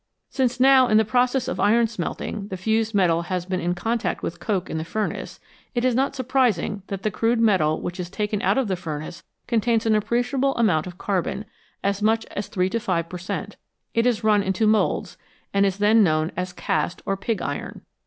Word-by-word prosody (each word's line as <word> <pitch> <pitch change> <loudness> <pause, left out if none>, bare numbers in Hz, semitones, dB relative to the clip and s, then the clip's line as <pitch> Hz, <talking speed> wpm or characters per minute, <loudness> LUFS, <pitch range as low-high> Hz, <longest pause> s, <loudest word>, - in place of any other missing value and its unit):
Since 255 -2 0
now 260 0 +6
in 215 - +4
the 220 - +4
process 250 +3 +1
of - - -3
iron 230 +3 +4
smelting 205 -1 -4
the 190 - -5
fused 220 +3 0
metal 170 -4 +3
has 180 0 -3
been 185 0 -2
in 175 0 -1
contact 225 +6 -2
with 170 - -4
coke 185 0 -1
in 160 - -3
the - - -3
furnace, 215 +6 -4 0.4
it 240 +1 +1
is 255 - +3
not 270 +3 +1
surprising 250 -6 +1
that 195 -1 -5
the 215 - 0
crude 230 +4 +1
metal 185 -9 +3
which 175 +2 -5
is 175 -1 -4
taken 210 +1 -2
out 255 - +2
of 265 -4 +1
the 190 - 0
furnace 155 -1 -6 0.2
contains 230 -1 +1
an 220 - +3
appreciable 245 +5 +1
amount 185 -9 +2
of 180 0 -9
carbon, 195 +2 -2 0.4
as 200 +1 0
much 225 +1 +2
as 205 - -4
3 180 -1 0
to 230 - 0
5 170 -5 -1
per 180 - -6
cent.; 180 - -5 0.4
it 230 +1 +2
is 235 -2 0
run 210 -1 +4
into 190 +2 0
moulds, 215 0 +1 0.3
and 200 0 +4
is 195 0 -2
then 210 +2 +5
known 155 -2 +1
as 180 0 -3
cast 180 - -2
or 195 - 0
pig 200 +2 -2
iron. 145 - -5
210 Hz, 210 wpm, -23 LUFS, 180-230 Hz, 0.4 s, now